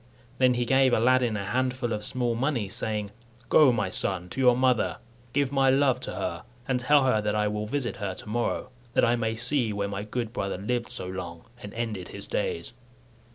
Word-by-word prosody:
Then 130 -1 +4
he 120 0 0
gave 130 0 +4
Aladdin 120 -1 +3
a 100 - -4
handful 125 +2 -1
of 105 0 -3
small 120 +1 -1
money, 120 -4 -1
saying, 105 -1 -2 0.4
"Go, 150 -4 +7
my 105 -5 0
son, 90 -2 0
to 135 - -3
your 125 -1 +5
mother, 125 -3 +2 0.3
give 140 0 +1
my 135 -1 +3
love 135 -1 +3
to 125 - -6
her, 85 0 -3 0.2
and 130 -1 +1
tell 140 +3 +4
her 125 -5 +2
that 105 0 -1
I 105 0 +2
will 105 0 -2
visit 125 -1 -2
her 100 -4 -3
to - - -11
morrow, 120 +3 -2 0.2
that - - +4
I 120 - +3
may 115 -1 -1
see 120 0 0
where 100 -1 -2
my 100 0 -4
good 115 +2 -4
brother 100 -6 -2
lived 120 +5 -2
so - - -2
long, 90 -2 -6 0.2
and 100 - -8
ended 110 -6 -3
his - - -5
days." 85 +7 -3
115 Hz, 205 wpm, -27 LUFS, 105-130 Hz, 0.4 s, Go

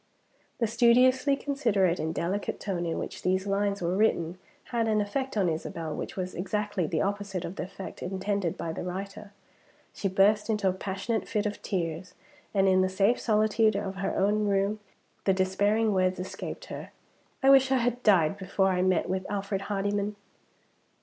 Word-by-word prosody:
The 235 - +1
studiously 250 +4 +4
considerate 225 -12 +1
and 160 +1 -1
delicate 185 +5 -2
tone 175 -4 -2
in 165 - -2
which - - -5
these 185 +1 +1
lines 200 -1 0
were 175 +2 0
written 185 -4 +1 0.3
had 230 -2 +1
an 215 -1 +2
effect 260 +4 -2
on 195 -3 +3
Isabel 160 -1 -3
which - - -5
was 185 -1 -4
exactly 200 -1 -2
the 155 0 0
opposite 200 -2 -3
of 175 - -6
the - - -4
effect 195 +1 -9
intended 190 -1 -2
by 165 - -3
the - - -5
writer. 195 +3 -6 0.6
She 195 - -2
burst 200 +3 +3
into 210 -3 +1
a 185 - +2
passionate 195 +4 -3
fit 210 0 -1
of 205 0 -3
tears; 175 -1 -3 0.4
and 195 -1 +3
in 185 0 +4
the 185 - +2
safe 200 +5 +2
solitude 215 0 +2
of 195 -1 -3
her 195 0 -2
own 210 +2 +2
room, 200 +1 +1 0.5
the 195 - +4
despairing 205 +4 +2
words 185 -1 +1
escaped 190 +1 -6
her, - - -7 0.5
"I 270 - +7
wish 265 -1 +6
I 265 - +4
had 245 0 0
died 195 -5 +3
before 190 0 +1
I 180 -1 +1
met 185 -2 +2
with 185 +1 -3
Alfred 195 -1 -2
Hardyman!" 205 +1 -1
195 Hz, 175 wpm, -28 LUFS, 185-210 Hz, 0.6 s, I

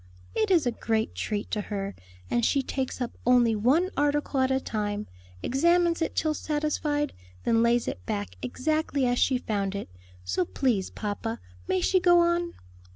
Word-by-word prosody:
"It 435 -2 +1
is 350 -7 +4
a 245 - +2
great 225 -1 -1
treat 210 -1 -3
to 210 - 0
her; 200 -1 -4 0.3
and 235 - 0
she 275 +3 +2
takes 260 0 -3
up 245 - -1
only 240 -2 +4
one 285 - +2
article 290 -1 +1
at 260 0 +3
a 265 0 +2
time, 210 -3 -3 0.4
examines 340 +5 +3
it 325 - -1
till 310 -1 +1
satisfied, 295 -1 -1 0.3
then 230 -1 +3
lays 235 0 +3
it 90 - -4
back 100 -3 -3
exactly 290 - 0
as 245 0 +1
she 260 - +3
found 200 -5 -2
it. 200 - -5 0.3
So 90 - 0
please, 220 -2 0
papa, 205 - -4 0.3
may 185 - +1
she 375 - +3
go 350 -1 +5
on?" 345 0 +1
250 Hz, 170 wpm, -27 LUFS, 210-305 Hz, 0.4 s, go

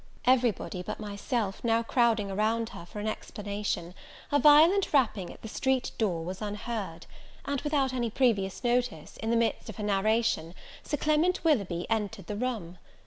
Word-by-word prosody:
Everybody, 240 -7 +2
but 180 - -5
myself, 205 0 -3
now 230 -1 +2
crowding 230 -4 +2
around 220 +3 0
her 170 -6 -10
for 210 - -8
an 210 - -3
explanation, 205 -5 -4 0.4
a 290 - +4
violent 315 +8 +6
rapping 220 -10 +2
at - - -15
the - - -5
street 260 +3 0
door 175 -7 0
was 185 +3 -6
unheard; 205 -4 -4 0.4
and, 280 -1 -1
without 285 -3 +1
any 240 -2 0
previous 210 -6 +1
notice, 240 -9 -1
in 225 - -3
the 235 - +3
midst 230 0 0
of - - -7
her 215 - -5
narration, 210 -4 +1 0.3
Sir 295 - -3
Clement 310 +5 +2
Willoughby 200 - +1
entered 215 -2 -2
the 210 - -4
room. 210 -7 -3
220 Hz, 165 wpm, -29 LUFS, 200-250 Hz, 0.4 s, violent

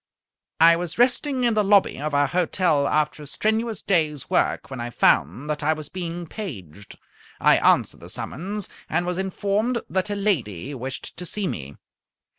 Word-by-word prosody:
I 165 +1 +7
was 175 -2 -5
resting 255 +2 +2
in 235 -2 +3
the 215 -1 +2
lobby 200 -8 +3
of 150 -1 -2
our 145 0 +4
hotel 165 -2 +1
after 150 0 0
a 145 - -9
strenuous 220 +5 -1
day's 155 -7 0
work, - - +1
when 130 - -5
I 120 - -4
found 120 - +2
that 150 - -3
I 155 +2 +2
was 155 -2 -7
being 175 -1 -5
paged. 100 - -8 0.4
I - - +5
answered - - +2
the - - -10
summons, 195 +7 -4 0.2
and 175 - 0
was 180 +1 -2
informed 205 +5 0
that 190 +2 0
a 205 - -1
lady 145 - -1
wished 130 +1 -6
to 180 - -6
see 210 +2 -2
me. 70 - -5
170 Hz, 175 wpm, -24 LUFS, 140-200 Hz, 0.4 s, I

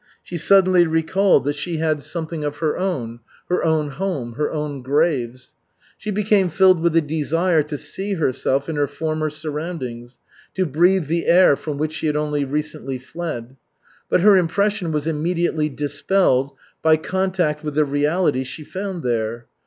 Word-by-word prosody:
She 175 - -8
suddenly 185 -1 +5
recalled 165 +3 +2
that 145 0 0
she 165 +3 -3
had 155 -2 0
something 160 0 -4
of 145 -1 -3
her 155 -2 0
own: 130 -12 -3 0.3
her 180 - +1
own 155 -2 +1
home, 140 -6 -3
her 150 +4 -2
own 150 -3 -4
graves. 130 -3 -1 0.4
She 215 - -7
became 205 -2 +2
filled 185 +1 +4
with 170 0 +1
a 165 - +5
desire 160 +3 +1
to 150 0 -5
see 195 +7 -3
herself 135 -3 0
in 160 -2 -3
her 145 -1 +1
former 155 0 -2
surroundings, 150 -6 -6 0.4
to 185 - +1
breathe 175 +4 +3
the 165 +3 -1
air 175 -4 +6
from 150 0 -5
which 155 +1 -2
she 160 - -2
had 150 - 0
only 150 -1 0
recently 150 -1 -4
fled. 130 -3 -6 0.5
But - - +3
her 205 +1 +7
impression 185 0 0
was 150 -1 -1
immediately 160 0 0
dispelled 145 0 +1 0.3
by 160 0 +4
contact 180 -3 -1
with 150 -2 -4
the 155 0 +3
reality 145 0 +1
she 130 +4 -6
found 190 +1 -5
there. 115 -1 -2
155 Hz, 165 wpm, -21 LUFS, 145-175 Hz, 0.5 s, her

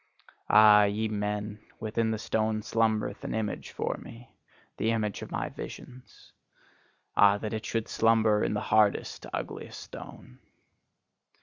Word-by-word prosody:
Ah, 105 0 +8
ye 105 +2 0
men, 105 0 -3 0.2
within 110 +1 -1
the 110 - -1
stone 110 0 -1
slumbereth 110 -2 0
an - - -3
image 110 -2 -3
for - - -3
me, 115 +1 -13 0.4
the 110 - 0
image 110 -3 -1
of - - -7
my - - -2
visions! 125 0 -11 0.8
Ah, 100 0 +6
that 105 +1 -5
it 110 0 -4
should 115 -1 -2
slumber 110 -2 +3
in - - 0
the 105 - -1
hardest, 105 -1 +1
ugliest - - -5
stone! 60 - -11
110 Hz, 135 wpm, -28 LUFS, 105-110 Hz, 0.8 s, Ah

